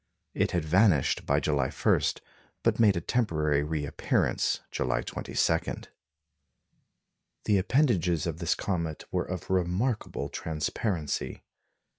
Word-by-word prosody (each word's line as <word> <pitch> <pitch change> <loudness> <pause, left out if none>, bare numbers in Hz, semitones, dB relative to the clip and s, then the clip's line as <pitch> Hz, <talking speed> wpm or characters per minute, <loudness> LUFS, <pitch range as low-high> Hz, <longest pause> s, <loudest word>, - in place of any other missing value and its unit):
It - - +1
had 85 -3 -1
vanished 90 -2 +3
by 70 +1 +3
July 70 -3 0
1, 70 - +2 0.6
but - - +2
made 105 -5 +5
a - - -1
temporary 75 - +1
reappearance 75 -1 0
July - - -1
22. 80 0 0 1.9
The 105 - +3
appendages 95 - +2
of 85 -1 -3
this 85 -1 +1
comet 85 -5 -3
were - - 0
of 90 0 -5
remarkable 95 +7 0
transparency. 80 0 -3
85 Hz, 110 wpm, -28 LUFS, 75-95 Hz, 1.9 s, made